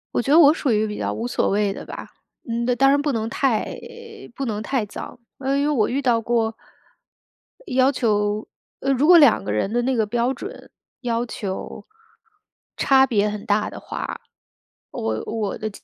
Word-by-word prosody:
我 - - +3
觉 270 - -2
得 315 - +7
我 300 -2 +8
属 285 -5 -1
于 215 0 +2
比 210 - -5
较 - - -2
无 230 - -3
所 - - 0
谓 205 0 +1
的 - - -9
吧。 - - -8 0.4
嗯， 235 +1 -1
当 270 +2 +5
然 285 +1 +3
不 290 0 0
能 225 -3 -2
太 235 -2 0 0.6
不 275 - -3
能 215 -3 -3
太 245 -1 -1
早， 205 - -9 0.2
啊， 270 0 0
因 280 - +1
为 - - +1
我 240 -8 +2
遇 270 +3 -1
到 240 -4 +2
过 225 -1 0 1.1
要 260 +1 +3
求 210 -4 0 0.3
呃， 275 - +1
如 270 +3 +2
果 350 0 +9
两 290 -8 +6
个 - - -3
人 105 - -1
的 240 - +2
那 260 +2 0
个 220 -2 +2
标 240 +4 0
准 - - -9 0.3
要 235 -1 -1
求 200 -5 -6 0.9
差 265 -1 +5
别 210 -5 +1
很 210 0 -6
大 210 0 +1
的 - - -10
话， - - -6 0.7
我 110 0 -2
我 215 -3 -3
的 215 - -3
235 Hz, 205 characters per minute, -22 LUFS, 210-270 Hz, 1.1 s, 果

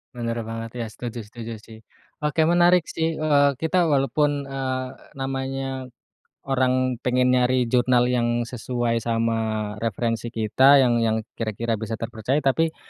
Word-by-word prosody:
Bener 115 -1 -3
banget 115 0 -6
ya, - - -2
setuju 120 +1 -6
setuju 115 +2 -8
sih. 110 -1 -13 0.5
Oke, 150 +2 +1
menarik 175 +1 +5
sih, 165 0 -1
eee, 145 -2 +3
kita 175 +2 +2
walaupun, 145 0 +1
eee, 130 -1 -3 0.2
namanya 135 -1 -4 0.6
orang 130 -1 +1
pengen 125 0 +2
nyari 125 0 +2
jurnal 125 0 +3
yang 120 -1 +1
sesuai 120 -1 -2
sama 115 0 0 0.5
referensi 115 +1 -1
kita, 130 +6 +5
yang 120 -1 +2
yang 110 -1 0 0.2
kira-kira 115 0 -2
bisa 110 0 -4
terpercaya 115 +6 -2
tapi, 160 +4 +1
125 Hz, 135 wpm, -23 LUFS, 115-135 Hz, 0.6 s, menarik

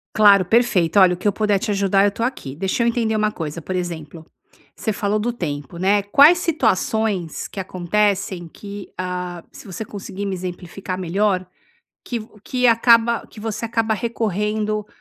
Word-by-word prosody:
Claro. 200 -3 +7
Perfeito. 200 -5 +3
Olha, 185 -1 +6
o - - -4
que 195 - -2
eu 205 - +4
puder 210 -1 +1
te 210 - -2
ajudar, 195 0 +3
eu 205 - +2
tô 230 +3 -4
aqui. 190 - -3
Deixa 190 +8 -1
eu 235 - +2
entender 225 -2 0
uma 215 0 +1
coisa, 165 -3 -5
por 185 +4 -4
exemplo, 165 -3 -5 0.5
você 220 - -2
falou 210 0 0
do 240 +3 -1
tempo, 150 - -5
né. 200 +3 +3
Quais 285 - +6
situações, 220 - 0
que 195 - -8
acontecem 190 0 -1
que, 200 +3 -10
hã, 180 -1 -4
se - - -13
você 200 +3 -6
conseguir 200 0 -6
me 195 - -2
exemplificar 180 +1 -6
melhor. 185 +1 0 0.6
Que 235 -2 -3
v 215 - -11 0.2
que 250 -1 +1
acaba 230 0 +4
que 215 - -13
você 220 0 -4
acaba 225 -1 0
recorrendo 215 -1 -1
200 Hz, 175 wpm, -21 LUFS, 180-220 Hz, 0.6 s, Claro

